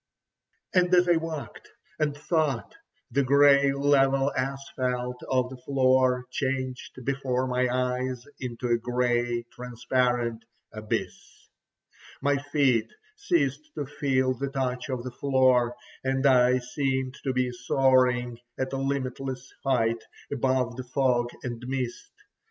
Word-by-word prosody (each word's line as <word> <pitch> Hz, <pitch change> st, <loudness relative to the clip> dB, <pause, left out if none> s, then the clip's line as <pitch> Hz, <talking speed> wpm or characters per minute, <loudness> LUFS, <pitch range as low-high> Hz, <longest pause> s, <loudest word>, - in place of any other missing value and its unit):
And 180 Hz, -1 st, +3 dB
as 180 Hz, 0 st, +4 dB
I 175 Hz, -1 st, +5 dB
walked, 160 Hz, -2 st, -6 dB, 0.3 s
and 145 Hz, -2 st, 0 dB
thought, 150 Hz, -5 st, -1 dB, 0.4 s
the 140 Hz, -, +2 dB
grey 140 Hz, +1 st, +5 dB
level 135 Hz, 0 st, +3 dB
asphalt 130 Hz, -2 st, -3 dB
of 130 Hz, -1 st, +1 dB
the 130 Hz, -, -8 dB
floor 130 Hz, -1 st, +2 dB
changed 130 Hz, -2 st, -3 dB
before 130 Hz, -2 st, 0 dB
my 125 Hz, 0 st, +1 dB
eyes 125 Hz, 0 st, -1 dB
into 125 Hz, -1 st, -4 dB
a 120 Hz, 0 st, +3 dB
grey, 120 Hz, 0 st, 0 dB
transparent 125 Hz, -1 st, -1 dB, 0.3 s
abyss. 110 Hz, 0 st, -5 dB, 0.7 s
My 145 Hz, 0 st, +2 dB
feet 135 Hz, -6 st, +1 dB, 0.2 s
ceased 150 Hz, -, -1 dB
to 145 Hz, -, -3 dB
feel 135 Hz, -2 st, 0 dB
the 135 Hz, +2 st, -4 dB
touch 130 Hz, -2 st, -2 dB
of 130 Hz, -2 st, -3 dB
the 125 Hz, -, -5 dB
floor, 130 Hz, -2 st, +2 dB, 0.3 s
and 135 Hz, +1 st, 0 dB
I 125 Hz, -1 st, +5 dB
seemed 130 Hz, +1 st, -2 dB
to 135 Hz, -, 0 dB
be 130 Hz, -1 st, 0 dB
soaring 125 Hz, -1 st, +2 dB, 0.2 s
at 130 Hz, 0 st, -3 dB
a -, -, -1 dB
limitless 135 Hz, -1 st, -3 dB
height 115 Hz, -4 st, +1 dB, 0.3 s
above 130 Hz, -2 st, 0 dB
the 130 Hz, -, -4 dB
fog 125 Hz, -2 st, +1 dB
and 120 Hz, -1 st, -5 dB
mist. 130 Hz, -2 st, -3 dB
130 Hz, 125 wpm, -27 LUFS, 125-135 Hz, 0.7 s, I